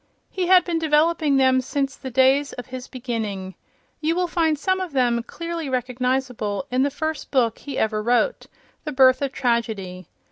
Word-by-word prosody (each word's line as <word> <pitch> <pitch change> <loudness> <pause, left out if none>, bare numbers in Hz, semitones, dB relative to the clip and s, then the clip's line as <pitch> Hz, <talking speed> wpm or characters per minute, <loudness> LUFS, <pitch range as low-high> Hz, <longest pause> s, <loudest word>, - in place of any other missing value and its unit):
He 370 -2 -2
had 370 0 +6
been 335 -2 -1
developing 315 -1 +2
them 260 -1 +4
since 275 +1 -2
the 265 - -7
days 265 +3 +3
of 245 - -7
his 255 -1 -8
beginning. 220 -7 -4 0.5
You 320 +2 0
will 360 0 +1
find 330 -3 +1
some 375 +5 0
of 365 -5 -5
them, 240 -3 +2
clearly 335 +4 -5
recognizable, 250 -3 -2
in 255 +1 +2
the 280 - +2
first 315 +2 -4
book 240 -5 +1
he 280 -2 -6
ever 215 -1 0
wrote, 245 - +1 0.4
"The 300 - -5
Birth 260 0 +5
of 275 -2 -1
Tragedy." 220 - -2
265 Hz, 175 wpm, -23 LUFS, 240-310 Hz, 0.5 s, had